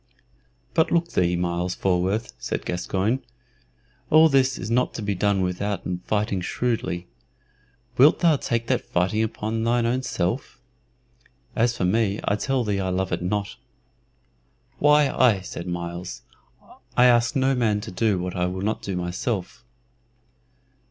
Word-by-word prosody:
"But 160 Hz, -1 st, +2 dB
look 170 Hz, 0 st, +2 dB
thee, 90 Hz, -1 st, +1 dB
Myles 90 Hz, +1 st, -1 dB
Falworth," 95 Hz, +4 st, 0 dB
said -, -, -4 dB
Gascoyne, 95 Hz, +7 st, -1 dB, 0.9 s
"all 160 Hz, +1 st, +7 dB
this 135 Hz, -2 st, +2 dB
is 110 Hz, -, -5 dB
not 125 Hz, +2 st, +1 dB
to 110 Hz, -, -4 dB
be 100 Hz, 0 st, 0 dB
done 100 Hz, +1 st, +1 dB
withouten 90 Hz, 0 st, -2 dB
fighting 105 Hz, -3 st, 0 dB
shrewdly. 90 Hz, -4 st, -2 dB, 0.9 s
Wilt 145 Hz, +4 st, +7 dB
thou 165 Hz, -4 st, +4 dB
take 115 Hz, -3 st, -2 dB
that -, -, +1 dB
fighting 95 Hz, +5 st, 0 dB
upon 110 Hz, 0 st, -2 dB
thine 120 Hz, 0 st, +2 dB
own 125 Hz, +2 st, +1 dB
self? 90 Hz, -8 st, -3 dB, 1.0 s
As 120 Hz, 0 st, +1 dB
for 90 Hz, -, 0 dB
me, 105 Hz, +1 st, +1 dB
I 100 Hz, -, +2 dB
tell 130 Hz, +4 st, 0 dB
thee 105 Hz, -3 st, -1 dB
I 95 Hz, -1 st, -1 dB
love 95 Hz, +1 st, -1 dB
it 90 Hz, -, -1 dB
not." 100 Hz, +3 st, -2 dB, 1.2 s
"Why, 150 Hz, 0 st, +5 dB
aye," 120 Hz, -7 st, +3 dB
said 90 Hz, -1 st, -7 dB
Myles; 85 Hz, -6 st, -5 dB, 0.7 s
"I 125 Hz, -, +7 dB
ask 120 Hz, +1 st, +4 dB
no 135 Hz, 0 st, +2 dB
man 110 Hz, -5 st, +1 dB
to -, -, -7 dB
do 105 Hz, +1 st, +1 dB
what 90 Hz, +1 st, -4 dB
I 90 Hz, 0 st, 0 dB
will 95 Hz, +1 st, -4 dB
not 110 Hz, +2 st, -1 dB
do 95 Hz, -, -4 dB
myself." 90 Hz, +4 st, -3 dB
105 Hz, 150 wpm, -24 LUFS, 90-120 Hz, 1.2 s, all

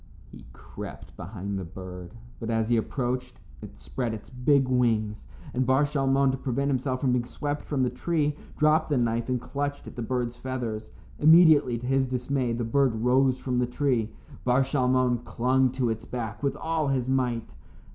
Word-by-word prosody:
He -, -, -13 dB
crept -, -, -10 dB
behind 100 Hz, +1 st, -5 dB
the -, -, -4 dB
bird, 90 Hz, +2 st, -9 dB, 0.2 s
but 115 Hz, -, -5 dB
as 115 Hz, -1 st, 0 dB
he 120 Hz, -, +4 dB
approached 125 Hz, +1 st, -2 dB, 0.2 s
it -, -, -10 dB
spread 110 Hz, -, -3 dB
its 105 Hz, -, -12 dB
big 130 Hz, +2 st, +3 dB
wings, 115 Hz, -4 st, 0 dB, 0.3 s
and 130 Hz, -, +1 dB
Bar 130 Hz, +3 st, +3 dB
Shalmon, 135 Hz, -1 st, +2 dB
to 130 Hz, -, -4 dB
prevent 140 Hz, +2 st, -1 dB
himself 130 Hz, -1 st, -1 dB
being 125 Hz, -2 st, +2 dB
swept 145 Hz, +4 st, -4 dB
from 140 Hz, -3 st, -1 dB
the 125 Hz, -, +1 dB
tree, 150 Hz, +2 st, 0 dB, 0.2 s
dropped 155 Hz, +1 st, +3 dB
the 145 Hz, -, +2 dB
knife 115 Hz, 0 st, 0 dB
and 125 Hz, -1 st, +1 dB
clutched 145 Hz, +3 st, -4 dB
at -, -, -10 dB
the 120 Hz, -, -5 dB
bird's 120 Hz, 0 st, -2 dB
feathers. 120 Hz, -4 st, -4 dB, 0.3 s
Immediately, 155 Hz, -5 st, +6 dB
to 120 Hz, -, -7 dB
his 135 Hz, 0 st, +2 dB
dismay, 125 Hz, 0 st, -1 dB
the 120 Hz, +1 st, -2 dB
bird 125 Hz, +1 st, +2 dB
rose 130 Hz, +3 st, +3 dB
from 125 Hz, -1 st, -1 dB
the 125 Hz, -, +1 dB
tree. 125 Hz, -4 st, 0 dB, 0.3 s
Bar 125 Hz, +2 st, +3 dB
Shalmon 130 Hz, -2 st, +2 dB
clung 130 Hz, +2 st, +2 dB
to 125 Hz, -3 st, 0 dB
its 110 Hz, +1 st, -5 dB
back 115 Hz, -3 st, -5 dB
with 140 Hz, -1 st, 0 dB
all 160 Hz, -2 st, -1 dB
his 130 Hz, -2 st, 0 dB
might. 125 Hz, -3 st, -1 dB
125 Hz, 180 wpm, -27 LUFS, 115-135 Hz, 0.3 s, Immediately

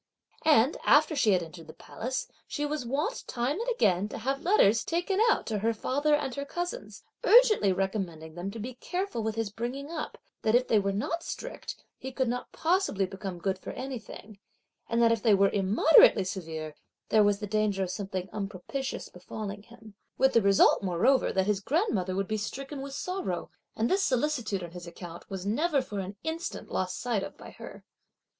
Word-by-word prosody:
And 290 Hz, -3 st, +5 dB
after 305 Hz, +1 st, +5 dB
she 225 Hz, -8 st, +4 dB
had 180 Hz, -2 st, +2 dB
entered 165 Hz, 0 st, -11 dB
the -, -, -10 dB
Palace, 255 Hz, +3 st, -4 dB, 0.2 s
she 295 Hz, -, -2 dB
was 295 Hz, -4 st, -3 dB
wont 300 Hz, -, -1 dB
time 255 Hz, -, -1 dB
and -, -, -2 dB
again 205 Hz, -, +2 dB
to -, -, -6 dB
have 270 Hz, +5 st, -2 dB
letters 230 Hz, -, +4 dB
taken 355 Hz, +4 st, -1 dB
out -, -, +2 dB
to 215 Hz, -2 st, -2 dB
her 225 Hz, +2 st, 0 dB
father 290 Hz, +7 st, +1 dB
and 270 Hz, -3 st, -2 dB
her 280 Hz, -, -3 dB
cousins, 350 Hz, -, -5 dB, 0.2 s
urgently 440 Hz, -, +6 dB
recommending 185 Hz, -5 st, -3 dB
them 175 Hz, +3 st, -5 dB
to 200 Hz, -, -8 dB
be 240 Hz, +4 st, -5 dB
careful 360 Hz, -, -3 dB
with 220 Hz, 0 st, -2 dB
his 225 Hz, -3 st, -2 dB
bringing 255 Hz, +7 st, -5 dB
up, 315 Hz, -2 st, -5 dB, 0.2 s
that 220 Hz, +1 st, +2 dB
if 250 Hz, +1 st, +3 dB
they 220 Hz, -, +4 dB
were 200 Hz, 0 st, 0 dB
not 225 Hz, +12 st, -2 dB
strict, -, -, -6 dB, 0.2 s
he 265 Hz, -, -6 dB
could 260 Hz, -1 st, 0 dB
not 245 Hz, +1 st, -3 dB
possibly 330 Hz, -, +1 dB
become 190 Hz, -1 st, -6 dB
good 190 Hz, +2 st, -2 dB
for -, -, -7 dB
anything, 225 Hz, -5 st, -8 dB, 0.5 s
and 235 Hz, 0 st, +2 dB
that 230 Hz, -, +5 dB
if 230 Hz, -2 st, +1 dB
they 220 Hz, -4 st, +5 dB
were 195 Hz, 0 st, +4 dB
immoderately 200 Hz, +3 st, +6 dB
severe, 160 Hz, -5 st, -5 dB, 0.4 s
there 215 Hz, -1 st, +5 dB
was 205 Hz, -1 st, +3 dB
the 210 Hz, -, -5 dB
danger 210 Hz, -2 st, 0 dB
of 180 Hz, -, -3 dB
something 190 Hz, -3 st, -4 dB
unpropitious 210 Hz, +7 st, -4 dB
befalling 200 Hz, +3 st, -7 dB
him, 220 Hz, -1 st, -15 dB, 0.2 s
with 265 Hz, 0 st, +4 dB
the 230 Hz, -, +5 dB
result, 200 Hz, -1 st, +5 dB
moreover, 195 Hz, +8 st, +2 dB
that 190 Hz, 0 st, +1 dB
his 205 Hz, -1 st, +1 dB
grandmother 205 Hz, -, 0 dB
would 195 Hz, 0 st, -1 dB
be 215 Hz, -, -1 dB
stricken 270 Hz, +6 st, -5 dB
with 275 Hz, 0 st, -6 dB
sorrow; 370 Hz, +4 st, -3 dB, 0.2 s
and 225 Hz, -, +1 dB
this 385 Hz, +7 st, +2 dB
solicitude 250 Hz, -, 0 dB
on 170 Hz, -, -7 dB
his 175 Hz, 0 st, -9 dB
account 170 Hz, 0 st, -10 dB
was 190 Hz, -1 st, -5 dB
never 290 Hz, +8 st, +2 dB
for 210 Hz, -6 st, -4 dB
an 195 Hz, +1 st, -5 dB
instant 320 Hz, +1 st, -4 dB
lost 185 Hz, 0 st, -1 dB
sight 235 Hz, -5 st, 0 dB
of 195 Hz, -, -7 dB
by -, -, -11 dB
her. -, -, -11 dB
220 Hz, 195 wpm, -29 LUFS, 195-280 Hz, 0.5 s, urgently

